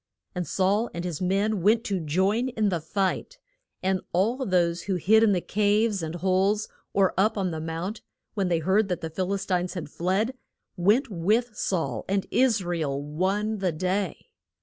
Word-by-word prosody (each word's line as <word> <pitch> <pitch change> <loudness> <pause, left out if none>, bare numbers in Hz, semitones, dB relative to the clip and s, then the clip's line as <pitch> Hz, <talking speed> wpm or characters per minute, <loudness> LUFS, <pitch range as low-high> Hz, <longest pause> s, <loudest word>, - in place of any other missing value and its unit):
And 180 -2 -3
Saul 200 +5 +1
and 170 +1 -4
his 170 -3 -4
men 195 +2 +1
went 220 +5 +3
to 195 -4 -1
join 190 - +1
in 220 -4 0
the 175 -4 -1
fight. 195 - -2 0.5
And 190 0 +1
all 225 +9 +1
those 175 -2 +1
who 195 - -1
had 175 - -5
hid 220 +5 +6
in 205 -5 +4
caves 210 0 +1
and 160 +1 -4
holes, 190 +4 +1 0.2
or 195 -2 +2
up 210 +3 +2
on 190 -3 0
the 160 -1 -4
mount, 165 +7 -4 0.3
when 195 -3 0
they 175 -2 +2
heard 190 +6 +2
that 180 -3 -2
the 160 - -5
Phil 185 +3 -2
is 195 0 -2
tines 180 -1 -1
had 155 -5 -5
fled, 195 +8 0 0.4
went 210 +8 +2
with 215 +6 +1
Saul, 140 - -1
and 195 0 +1
Is 240 -6 +3
ra 175 -1 -2
el 140 -3 -1
won 190 +9 -1
the 185 -2 +1
day. 185 +2 -2
190 Hz, 190 wpm, -26 LUFS, 175-210 Hz, 0.5 s, hid